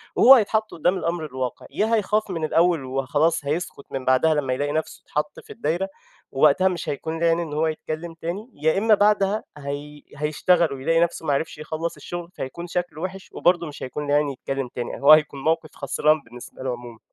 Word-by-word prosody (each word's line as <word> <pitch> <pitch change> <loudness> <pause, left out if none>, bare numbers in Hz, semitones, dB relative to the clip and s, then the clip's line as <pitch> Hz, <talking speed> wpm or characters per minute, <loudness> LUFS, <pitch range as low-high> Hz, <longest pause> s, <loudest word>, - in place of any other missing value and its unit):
وهو 270 +2 +9
هيتحط 215 -1 +1
قُدّام 175 +4 +1
الأمر 170 -2 -2
الواقع، 130 -4 -4
يا 220 +2 0
هيخاف 215 0 0
من 165 -3 -3
الأول 165 -1 +2
وخلاص 145 +4 0
هيسكُت 150 -1 -3
من 135 -1 -4
بعدها 130 +5 +4
لمّا 140 -4 0
يلاقي 145 +3 -1
نَفسه 155 +1 -3
اتحط 150 0 -3
في - - -12
الدايرة 175 +6 -1 0.4
ووقتها 150 +7 +4
مش 180 -3 -2
هيكون 160 +3 -3
ليه 170 - +2
عين 165 0 +3
إن 165 -3 -4
هو 155 +2 +1
يتكلّم 160 +1 -4
تاني، 175 +8 -5
يا 155 +4 +1
إمّا 220 +2 +4
بعدها 205 0 +2
هي 145 +1 -6
هيشتغل 155 +1 +2
ويلاقي 165 +5 +1
نَفسه 170 -1 0
ما 145 - +2
عرفش 150 +3 -2
يخلّص 160 +2 -4
الشُغل، 175 -1 -7
فهيكون 170 +7 -6
شكله 175 -2 -3
وِحِش 190 +1 -6
وبرضه 175 -1 +2
مش 150 - -8
هيكون 145 +3 -5
ليه 145 - +1
عين 145 0 +3
يتكلّم 135 0 -4
تاني، 120 +1 -6
هو 140 +2 +7
هيكون 150 -2 +5
موقف 160 0 +1
خسران 150 +2 +1
بالنسبة 125 +1 -11
له 130 - -1
عمومًا. 120 -2 -8
155 Hz, 195 wpm, -23 LUFS, 145-175 Hz, 0.4 s, وهو